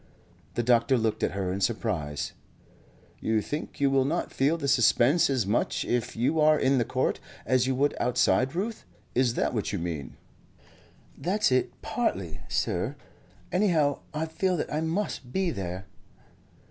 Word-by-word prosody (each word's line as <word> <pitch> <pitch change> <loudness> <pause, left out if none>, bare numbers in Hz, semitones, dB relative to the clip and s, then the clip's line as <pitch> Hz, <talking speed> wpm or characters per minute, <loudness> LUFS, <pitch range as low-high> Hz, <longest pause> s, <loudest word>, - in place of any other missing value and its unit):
The 120 - 0
doctor 120 +2 +4
looked 110 -2 0
at - - 0
her 95 -2 -2
in 100 - -4
surprise. 90 -8 -1 0.9
"You 110 0 +1
think 150 +8 -5
you 140 -1 +3
will 135 -1 +4
not 155 +6 -2
feel 145 +5 +2
the 140 -4 -3
suspense 135 +4 +4
as 130 -6 +1
much 105 +4 0
if 120 -2 -1
you 130 +8 +1
are 155 0 +5
in 135 0 +3
the 120 - +1
court 130 +2 0 0.3
as 130 -1 +2
you 130 - +1
would 145 +3 +1
outside 125 +3 +2
Ruth? 215 +5 -3 0.3
Is 125 -1 +2
that - - 0
what 110 -4 -1
you 100 - -1
mean?" 80 -7 -5 1.0
"That's 200 -1 +1
it, 130 0 0
partly, 95 - -2
sir. 105 +11 -1 0.6
Anyhow, 165 -7 +2
I 155 +1 -2
feel 180 +3 0
that - - -3
I 155 - 0
must 160 -6 -2
be 190 +1 0
there." 95 - -5
130 Hz, 160 wpm, -27 LUFS, 110-155 Hz, 1.0 s, are